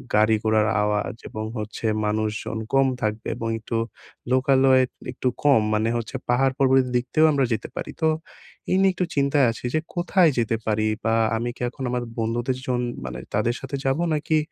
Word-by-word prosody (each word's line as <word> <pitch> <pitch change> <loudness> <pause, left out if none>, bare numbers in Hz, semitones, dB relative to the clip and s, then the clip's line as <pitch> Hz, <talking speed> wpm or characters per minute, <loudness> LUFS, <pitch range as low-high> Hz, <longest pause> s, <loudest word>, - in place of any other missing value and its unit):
গাড়ি 110 +1 +4
ঘোড়ার 110 -1 +3 0.2
আওয়াজ 105 +3 -1
এবং 110 0 -5
হচ্ছে 110 +1 -5 0.2
মানুষজন 110 +1 -2
কম 135 0 +5
থাকবে 110 +1 -2
এবং 115 -1 -3
একটু 115 +1 -3 0.5
লোকালয় 130 0 +4 0.3
একটু - - -3 0.2
কম 140 -6 +5
মানে 110 +1 +1
হচ্ছে 115 +2 -5
পাহাড় 130 +2 +3
পর্বতের 130 -1 +4
দিকতেও 130 +6 +2
আমরা 140 -2 +2
যেতে 110 - -3
পারি।" - - -5
তো 160 - +5 0.6
এই 185 - +4
নিয়ে 195 -1 +4
একটু 180 - -1
চিন্তায় 140 -1 +3
আছি 115 - -9
যে - - +3 0.2
কোথায় 175 0 +3
যেতে 115 -1 +1
পারি? 110 0 +1 0.2
বা 110 - +2 0.2
আমি 120 +2 -2
কি - - -13
এখন 130 - -8
আমার 125 -1 -1 0.2
বন্ধুদের 120 +3 -1
জন 125 -1 0 0.2
মানে 65 0 -5
তাদের 110 +4 +1
সাথে 135 +1 -5
যাবো 135 +5 +1
নাকি 155 +1 +1
120 Hz, 180 wpm, -24 LUFS, 110-135 Hz, 0.6 s, কম